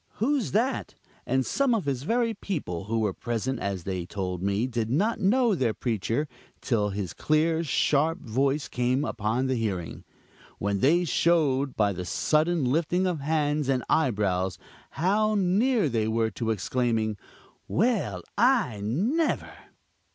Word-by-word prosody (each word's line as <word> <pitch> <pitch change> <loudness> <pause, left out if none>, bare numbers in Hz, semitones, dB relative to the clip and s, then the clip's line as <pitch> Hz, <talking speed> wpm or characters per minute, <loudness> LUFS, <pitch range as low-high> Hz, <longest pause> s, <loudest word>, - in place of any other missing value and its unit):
who's 260 +1 0
that?" 240 +6 0 0.3
And 130 -1 +1
some 275 -4 +2
of 200 -8 -2
his 135 -3 -1
very 230 - +1
people, 145 - -4
who 115 +2 -1
were 105 -3 0
present, 120 +4 -3
as 95 -3 -3
they 95 -1 -3
told 90 -1 -4
me, 100 +4 0
did 115 -3 -2
not 205 - +1
know 230 +3 +3
their 125 - 0
preacher 115 +5 -1 0.3
till 105 -5 0
his 100 -2 -4
clear, 160 +2 +1
sharp 155 +2 +2
voice 135 +5 0
came 125 +3 0
upon 110 +3 -1
the 130 - 0
hearing, 100 -8 -3 0.5
when 100 0 -1
they 170 - +3
showed, 145 -6 +2
by 105 -2 +2
the 90 0 -5
sudden 155 - +1
lifting 165 +7 +1
of 180 -4 -1
hands 150 -1 0
and 130 -3 +1
eyebrows, 100 - +1 0.3
how 215 +5 +1
near 205 +2 +2
they 115 -4 0
were 110 0 0
to 115 +3 -3
exclaiming: 110 0 0 0.5
"Well! 180 - 0 0.2
I 230 - +3
never!" 215 - 0
135 Hz, 145 wpm, -27 LUFS, 110-175 Hz, 0.5 s, know